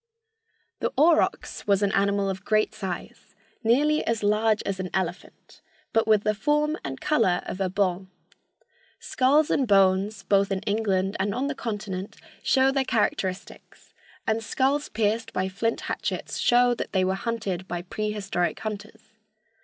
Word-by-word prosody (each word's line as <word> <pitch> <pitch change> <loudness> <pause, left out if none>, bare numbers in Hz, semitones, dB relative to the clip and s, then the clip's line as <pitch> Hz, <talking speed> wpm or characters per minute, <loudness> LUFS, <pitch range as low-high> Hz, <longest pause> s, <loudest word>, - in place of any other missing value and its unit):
The - - -1
aurochs 315 -5 +2
was 200 0 +3
an 200 - +2
animal 200 0 +1
of 190 0 -4
great 215 0 +1
size, 190 -4 -7 0.3
nearly 295 +7 +3
as 230 -2 -1
large 215 +1 +2
as 195 -1 -3
an 185 -1 -3
elephant, 180 -1 -5 0.3
but 225 -1 +2
with 215 -2 +4
the 215 - +2
form 300 +7 +1
and 135 -1 -5
color 225 -12 +1
of 190 - -5
a 190 - +1
bull. 190 -1 -1 0.9
Skulls 285 +4 +2
and 265 - +1
bones, 195 0 +3
both 195 0 +2
in 190 -1 -1
England 200 -2 0
and 200 0 0
on 260 - -1
the 285 - -1
Continent, 205 -5 -5 0.3
show 265 0 +3
their 270 0 +1
characteristics, 195 -6 -3 0.3
and 220 +1 0
skulls 275 +6 0
pierced 220 +1 -1
by 185 +1 0
flint 225 +5 -2
hatchets - - -4
show 245 0 +4
that - - -5
they 185 -1 +2
were 190 - +1
hunted 195 -3 -3
by 175 -1 -4
prehistoric 200 -2 -2
hunters. 210 -1 -7
205 Hz, 155 wpm, -25 LUFS, 190-230 Hz, 0.9 s, with